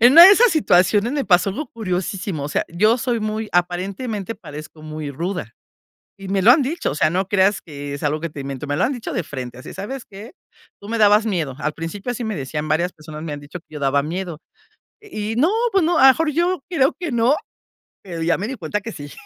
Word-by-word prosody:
en 240 Hz, +3 st, +7 dB
una 335 Hz, +3 st, +11 dB
de 385 Hz, -, +10 dB
esas 460 Hz, +4 st, +6 dB
situaciones 215 Hz, -, +3 dB
me 285 Hz, -2 st, -1 dB
pasó 180 Hz, +1 st, +4 dB
algo 290 Hz, +11 st, -4 dB
curiosísimo, 190 Hz, -4 st, -3 dB
o -, -, -3 dB
sea, -, -, 0 dB
yo 215 Hz, +8 st, +3 dB
soy 240 Hz, -2 st, -1 dB
muy 215 Hz, 0 st, -3 dB
aparentemente 190 Hz, +5 st, -1 dB
parezco 155 Hz, -3 st, -10 dB
muy 155 Hz, -1 st, -6 dB
ruda 175 Hz, +7 st, -4 dB, 0.7 s
y 195 Hz, -, -9 dB
me 195 Hz, 0 st, +1 dB
lo 220 Hz, -, +7 dB
han 280 Hz, +3 st, +6 dB
dicho. 320 Hz, +6 st, -2 dB
O -, -, -4 dB
sea, 155 Hz, -, +3 dB
no 185 Hz, +2 st, -1 dB
creas 195 Hz, 0 st, +2 dB
que 145 Hz, -2 st, -7 dB
es 140 Hz, -, -7 dB
algo 150 Hz, +1 st, 0 dB
que 170 Hz, -, -3 dB
te 150 Hz, -2 st, -9 dB
invento. 135 Hz, +1 st, -5 dB
Me 145 Hz, 0 st, -1 dB
lo 180 Hz, -, +2 dB
han 265 Hz, -, +1 dB
dicho 245 Hz, -4 st, -5 dB
de -, -, 0 dB
frente 130 Hz, -5 st, -7 dB
así: -, -, -9 dB
"¿Sabes 235 Hz, +7 st, -6 dB
qué? 210 Hz, +6 st, -11 dB, 0.5 s
Tú 200 Hz, -, -11 dB
me 230 Hz, +1 st, -1 dB
dabas 210 Hz, +1 st, +5 dB
miedo 165 Hz, -10 st, -1 dB
al 150 Hz, 0 st, -2 dB
principio", 195 Hz, +10 st, -5 dB
así 240 Hz, 0 st, -5 dB
me 215 Hz, -4 st, -3 dB
decían, 150 Hz, +2 st, -4 dB
varias 170 Hz, +4 st, +1 dB
personas 155 Hz, 0 st, -10 dB
me 155 Hz, -2 st, -5 dB
han 145 Hz, -, -6 dB
dicho 145 Hz, +5 st, -9 dB
que 155 Hz, -, -19 dB
yo 150 Hz, -, -6 dB
daba 140 Hz, 0 st, +2 dB
miedo 170 Hz, +1 st, -5 dB, 0.6 s
y 220 Hz, -, -4 dB
no, 305 Hz, +8 st, +3 dB, 0.2 s
pues 385 Hz, -3 st, +3 dB
no, 340 Hz, 0 st, +2 dB
a -, -, +4 dB
lo -, -, +10 dB
mejor 310 Hz, +4 st, +3 dB
yo 345 Hz, +1 st, 0 dB
creo 275 Hz, -6 st, +2 dB
que 345 Hz, -4 st, -3 dB
no, 240 Hz, +4 st, +3 dB, 0.7 s
pero 170 Hz, -4 st, -7 dB
ya 165 Hz, -, +2 dB
me 205 Hz, +4 st, -3 dB
di 270 Hz, -, -4 dB
cuenta 205 Hz, 0 st, -3 dB
que 230 Hz, -, -6 dB
sí, 145 Hz, -1 st, -9 dB
195 Hz, 245 wpm, -21 LUFS, 155-235 Hz, 0.7 s, una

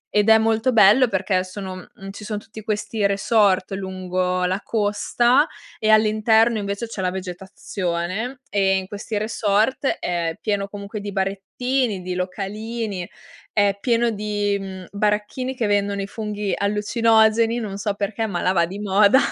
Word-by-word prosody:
Ed 210 Hz, +1 st, +4 dB
è 220 Hz, -, +8 dB
molto 225 Hz, +3 st, +1 dB
bello 215 Hz, +4 st, +6 dB
perché 190 Hz, -2 st, 0 dB
sono 190 Hz, 0 st, -7 dB, 0.2 s
mhmm, 195 Hz, 0 st, -10 dB
ci 210 Hz, -, -10 dB
son 210 Hz, 0 st, -3 dB
tutti 220 Hz, 0 st, -11 dB
questi 215 Hz, 0 st, -2 dB
resort 200 Hz, -1 st, +2 dB
lungo 185 Hz, -1 st, -2 dB
la 185 Hz, +2 st, 0 dB
costa 235 Hz, +6 st, +2 dB, 0.3 s
e 215 Hz, -, 0 dB
all'interno 220 Hz, +1 st, +4 dB
invece 200 Hz, +3 st, -3 dB
c'è 220 Hz, -4 st, -5 dB
la 185 Hz, -, +1 dB
vegetazione, 185 Hz, +4 st, -4 dB
e 195 Hz, -1 st, +2 dB
in 190 Hz, -, -3 dB
questi 205 Hz, +2 st, -5 dB
resort 220 Hz, +5 st, +1 dB
è 170 Hz, -2 st, -1 dB
pieno 205 Hz, -2 st, -1 dB
comunque 200 Hz, +1 st, -7 dB
di 205 Hz, 0 st, -5 dB
barettini, 200 Hz, +3 st, -1 dB
di 180 Hz, 0 st, -3 dB
localini, 200 Hz, +1 st, -4 dB, 0.4 s
è 205 Hz, -1 st, +3 dB
pieno 235 Hz, -1 st, +2 dB
di, 205 Hz, -1 st, -1 dB
mhmm, 190 Hz, -1 st, -7 dB
baracchini 210 Hz, +5 st, -1 dB
che 245 Hz, -3 st, -1 dB
vendono 200 Hz, -1 st, +1 dB
i 195 Hz, -, -5 dB
funghi 210 Hz, -2 st, -3 dB
allucinogeni, 220 Hz, +2 st, +3 dB
non 200 Hz, -3 st, -5 dB
so 200 Hz, 0 st, -1 dB
perché 210 Hz, +2 st, -2 dB
ma 180 Hz, -4 st, -3 dB
là 180 Hz, -, +2 dB
va 170 Hz, -2 st, +2 dB
di 190 Hz, +3 st, -7 dB
moda. 205 Hz, +3 st, +4 dB
205 Hz, 155 wpm, -22 LUFS, 190-220 Hz, 0.4 s, è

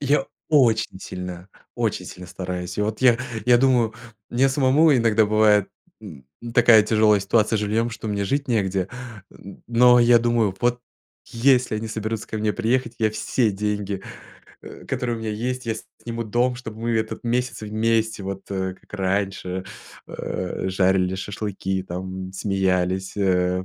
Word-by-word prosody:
Я 140 Hz, -1 st, +1 dB, 0.2 s
очень 115 Hz, -9 st, +3 dB
сильно, 90 Hz, 0 st, -7 dB, 0.3 s
очень -, -, -1 dB
сильно 90 Hz, -, -9 dB
стараюсь. 90 Hz, 0 st, -5 dB
И 105 Hz, -, +2 dB
вот 110 Hz, +1 st, -2 dB
я 120 Hz, -2 st, +5 dB, 0.3 s
я 120 Hz, -1 st, +6 dB
думаю, 120 Hz, -4 st, +2 dB, 0.4 s
мне 130 Hz, +3 st, +3 dB
самому 140 Hz, +3 st, +4 dB
иногда 115 Hz, -3 st, +3 dB
бывает, 105 Hz, -1 st, +4 dB, 0.3 s
н 80 Hz, -12 st, -11 dB, 0.2 s
ну 120 Hz, -, -7 dB
такая 115 Hz, -3 st, +6 dB
тяжелая 110 Hz, -1 st, +3 dB
ситуация 110 Hz, +2 st, +2 dB
с -, -, -1 dB
жильем, 110 Hz, +3 st, 0 dB
что 115 Hz, -1 st, -6 dB
мне 100 Hz, -1 st, -1 dB
жить 140 Hz, +5 st, -1 dB
негде, 95 Hz, -5 st, 0 dB, 0.4 s
н 100 Hz, -, -13 dB
но 125 Hz, +1 st, +5 dB
я 120 Hz, 0 st, +6 dB
думаю: 115 Hz, -4 st, +1 dB
вот 120 Hz, 0 st, +1 dB, 0.5 s
если 125 Hz, -1 st, +2 dB
они 110 Hz, +1 st, -4 dB
соберутся 110 Hz, 0 st, -4 dB
ко 110 Hz, -, -4 dB
мне 105 Hz, 0 st, 0 dB
приехать, 120 Hz, +3 st, -1 dB
я 110 Hz, -1 st, +2 dB
все 110 Hz, +2 st, 0 dB
деньги, 100 Hz, -1 st, -3 dB, 0.6 s
э, -, -, -11 dB
которые 125 Hz, -2 st, -2 dB
у 115 Hz, -, -8 dB
меня 110 Hz, -1 st, -3 dB
есть, 125 Hz, +4 st, -3 dB
я 115 Hz, -, 0 dB, 0.3 s
сниму 115 Hz, 0 st, -3 dB
дом, 120 Hz, +4 st, +1 dB
чтобы 110 Hz, -3 st, -9 dB
мы 120 Hz, -, -1 dB
этот 110 Hz, +1 st, -2 dB
месяц 120 Hz, -1 st, -1 dB
вместе 110 Hz, 0 st, 0 dB
вот, 95 Hz, 0 st, -5 dB
э, 95 Hz, -1 st, -2 dB
как -, -, -26 dB
раньше, 95 Hz, -1 st, -2 dB, 0.4 s
э, 95 Hz, +1 st, -4 dB
жарили 95 Hz, -1 st, +2 dB
шашлыки, 95 Hz, -1 st, -3 dB
там 95 Hz, +1 st, -6 dB
смеялись, 95 Hz, -1 st, -1 dB
э, 90 Hz, -2 st, +1 dB
110 Hz, 160 wpm, -23 LUFS, 95-120 Hz, 0.6 s, я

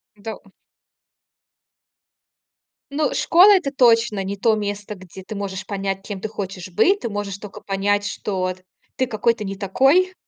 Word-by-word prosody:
Да. 220 Hz, +2 st, -7 dB, 2.5 s
Ну 295 Hz, 0 st, 0 dB
школа- 375 Hz, +5 st, +6 dB
это 325 Hz, -7 st, 0 dB
точно 230 Hz, -6 st, +3 dB
не 200 Hz, +1 st, -4 dB
то 220 Hz, +2 st, +3 dB
место, 205 Hz, 0 st, -4 dB
где 185 Hz, 0 st, -12 dB
ты 215 Hz, -, -7 dB
можешь 195 Hz, -1 st, -4 dB
понять, 195 Hz, -1 st, -3 dB
кем 200 Hz, -3 st, -6 dB
ты 220 Hz, -, -2 dB
хочешь 190 Hz, -3 st, -6 dB
быть. 390 Hz, -, +3 dB
Ты 235 Hz, -, -4 dB
можешь 205 Hz, -1 st, -4 dB
тока 205 Hz, -2 st, -10 dB
понять, 205 Hz, +1 st, 0 dB
что 200 Hz, -1 st, -3 dB
вот, 185 Hz, 0 st, -2 dB, 0.3 s
ты 260 Hz, -2 st, 0 dB
какой-то 230 Hz, 0 st, 0 dB
не 195 Hz, 0 st, -4 dB
такой, 270 Hz, -, +3 dB
205 Hz, 150 wpm, -22 LUFS, 195-235 Hz, 2.5 s, школа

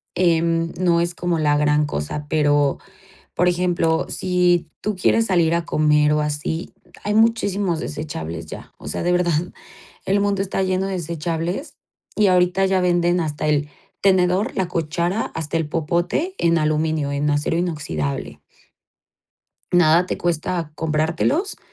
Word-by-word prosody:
em, 165 Hz, -1 st, +2 dB
no 170 Hz, -2 st, +3 dB
es 170 Hz, 0 st, -1 dB
como 175 Hz, -1 st, -1 dB
la 150 Hz, -2 st, +2 dB
gran 150 Hz, 0 st, +2 dB
cosa, 145 Hz, -, -4 dB
pero, 145 Hz, -2 st, +2 dB, 0.6 s
por 180 Hz, +1 st, +2 dB
ejemplo, 175 Hz, -2 st, +1 dB
si 180 Hz, -3 st, +1 dB
tú 215 Hz, -, -1 dB
quieres 225 Hz, +5 st, +2 dB
salir 170 Hz, -5 st, +2 dB
a 170 Hz, 0 st, 0 dB
comer 150 Hz, -1 st, +3 dB
o 150 Hz, -, +2 dB
así, 150 Hz, +3 st, -3 dB, 0.3 s
hay 210 Hz, -, 0 dB
muchísimos 205 Hz, -6 st, +2 dB
desechables 85 Hz, -, -5 dB
ya. -, -, -10 dB
O -, -, -12 dB
sea, -, -, -3 dB
de 175 Hz, -, +1 dB
verdad, 175 Hz, -1 st, +2 dB, 0.7 s
el 200 Hz, +1 st, +2 dB
mundo 200 Hz, -1 st, +1 dB
está 195 Hz, 0 st, -1 dB
lleno 185 Hz, +1 st, 0 dB
de 195 Hz, -, -3 dB
desechables 170 Hz, -, -3 dB, 0.4 s
y 210 Hz, -2 st, +3 dB
ahorita 180 Hz, +1 st, +3 dB
ya 190 Hz, 0 st, +2 dB
venden 175 Hz, 0 st, +2 dB
hasta 155 Hz, -2 st, -2 dB
el 150 Hz, -1 st, +1 dB, 0.3 s
tenedor, 185 Hz, +1 st, +2 dB
la 190 Hz, -2 st, 0 dB
cuchara, 170 Hz, +5 st, -1 dB
hasta 160 Hz, 0 st, -2 dB
el 160 Hz, -2 st, -1 dB
popote 170 Hz, -, -1 dB
en 170 Hz, 0 st, +2 dB
aluminio, 155 Hz, -1 st, 0 dB
en 145 Hz, +1 st, 0 dB
acero 145 Hz, +3 st, 0 dB
inoxidable. 150 Hz, -, -3 dB, 1.3 s
Nada 175 Hz, 0 st, +5 dB
te -, -, -3 dB
cuesta 170 Hz, -1 st, -2 dB
comprártelos. 160 Hz, -, 0 dB
170 Hz, 145 wpm, -21 LUFS, 150-180 Hz, 1.3 s, Nada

